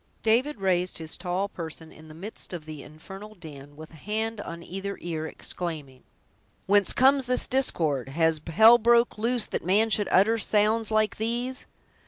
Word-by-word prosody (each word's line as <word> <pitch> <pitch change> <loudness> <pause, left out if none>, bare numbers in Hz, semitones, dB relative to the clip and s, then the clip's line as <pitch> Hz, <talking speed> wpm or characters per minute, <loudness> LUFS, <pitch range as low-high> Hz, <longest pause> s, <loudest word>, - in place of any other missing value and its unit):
David 240 +4 +1
raised 180 -1 0
his 160 -1 -2
tall 185 +2 -2
person 160 -3 -8
in 155 - -15
the 155 - -13
midst 195 +3 -8
of 165 -3 -7
the 155 -2 -8
infernal 195 +9 -12
din, 145 -5 -12
with 155 +1 -12
a - - -15
hand 220 +4 -3
on 170 -3 -8
either 195 +3 -6
ear, 160 -2 -4
exclaiming: 155 -7 -6 0.6
"Whence 200 -1 +4
comes 265 0 +3
this 250 0 +2
discord! 160 - 0
Has 160 +1 +1
hell 225 +7 +7
broke 235 0 +3
loose, 235 +1 0
that - - -4
man 210 +5 +2
should 205 -1 +2
utter 220 +4 +3
sounds 215 +1 +1
like 215 -1 +1
these!" 240 +4 -2
195 Hz, 170 wpm, -26 LUFS, 160-225 Hz, 0.6 s, hell